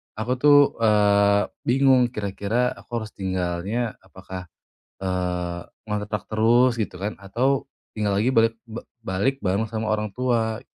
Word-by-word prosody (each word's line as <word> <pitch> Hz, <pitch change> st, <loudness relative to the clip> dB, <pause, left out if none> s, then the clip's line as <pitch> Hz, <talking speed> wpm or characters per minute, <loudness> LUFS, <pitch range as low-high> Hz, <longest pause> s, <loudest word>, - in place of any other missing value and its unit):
aku 110 Hz, +4 st, -3 dB
tuh, 145 Hz, +1 st, +7 dB, 0.2 s
eee, 100 Hz, -2 st, +3 dB, 0.2 s
bingung 130 Hz, 0 st, +4 dB
kira-kira 110 Hz, +2 st, -1 dB
aku 120 Hz, -2 st, -5 dB
harus 110 Hz, -, -9 dB
tinggalnya, 95 Hz, +5 st, -3 dB
apakah, 95 Hz, -1 st, -10 dB, 0.6 s
eee, 90 Hz, -2 st, -2 dB, 0.2 s
ngontrak 105 Hz, -1 st, -3 dB
terus 120 Hz, +3 st, +3 dB
gitu 105 Hz, -4 st, -2 dB
kan, 100 Hz, +3 st, -5 dB
atau 125 Hz, +8 st, 0 dB, 0.2 s
tinggal 105 Hz, -2 st, -1 dB
lagi 110 Hz, +6 st, +2 dB
balik 115 Hz, -1 st, +3 dB
ba 115 Hz, -1 st, -7 dB, 0.2 s
balik 100 Hz, +8 st, 0 dB
bareng 100 Hz, +4 st, 0 dB
sama 110 Hz, 0 st, -3 dB
orang 105 Hz, -2 st, -2 dB
tua. 115 Hz, -3 st, 0 dB
110 Hz, 135 wpm, -24 LUFS, 100-120 Hz, 0.6 s, tuh